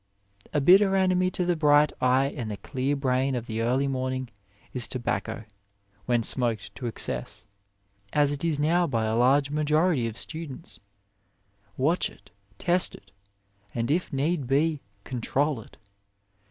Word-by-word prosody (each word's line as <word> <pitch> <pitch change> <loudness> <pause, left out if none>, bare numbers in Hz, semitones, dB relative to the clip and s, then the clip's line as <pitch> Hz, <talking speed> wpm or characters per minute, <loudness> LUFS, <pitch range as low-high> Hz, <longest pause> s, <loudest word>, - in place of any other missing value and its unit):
A 150 - +1
bitter 190 +6 +5
enemy 185 -1 +2
to 180 0 -2
the 175 0 +1
bright 150 -1 +4
eye 130 +2 +2
and 120 -5 -4
the 105 - -4
clear 130 +7 -2
brain 130 -1 0
of 120 -2 -3
the 110 -1 -3
early 130 +4 +1
morning 130 -1 -2 0.4
is 125 -2 -1
tobacco 110 -2 -3 0.6
when 120 -2 +1
smoked 110 -5 0
to 120 +4 -5
excess, 65 - -3 0.7
as 145 -1 +3
it 145 +1 -4
is 165 -3 +1
now 170 +4 +2
by 115 -4 0
a 110 0 0
large 135 +4 +3
majority 150 -2 +2
of 110 - -6
A - - -14
WAY - - -4
students. 140 -10 -6 1.0
Watch 155 +7 +2
it, - - -20 0.3
test 180 - +3
it, 100 - -17 0.6
and 115 +3 -1
if 175 +4 0
need 145 0 -1
be, 150 +2 +1 0.2
control 135 +1 -1
it. - - -17
135 Hz, 155 wpm, -26 LUFS, 120-155 Hz, 1.0 s, bitter